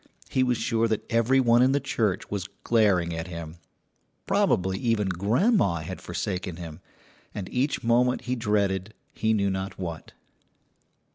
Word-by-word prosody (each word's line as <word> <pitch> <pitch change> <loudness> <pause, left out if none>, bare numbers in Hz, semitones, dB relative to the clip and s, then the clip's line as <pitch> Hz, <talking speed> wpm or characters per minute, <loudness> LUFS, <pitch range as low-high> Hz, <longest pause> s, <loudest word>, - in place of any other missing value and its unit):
He 130 - +2
was 125 -2 +2
sure 115 0 +1
that 110 -2 -2
every 115 +3 +3
one 120 -1 +4
in 130 +2 +4
the 140 - +2
church 105 -8 -1
was 100 -2 -3
glaring 100 -7 +2
at 80 +1 -4
him; 85 -2 -7 0.7
probably 95 +1 +1
even 110 -4 +1
grandma 100 - +2
had 90 +4 -7
forsaken 90 0 -4
him, 85 -2 -8 0.6
and 95 -3 -4
each 135 +4 -1
moment 125 +2 +2
he 125 0 -2
dreaded 105 -3 0 0.2
he 110 - 0
knew 100 -3 +2
not 95 +1 -4
what. 85 -4 -6
105 Hz, 150 wpm, -26 LUFS, 90-115 Hz, 0.7 s, one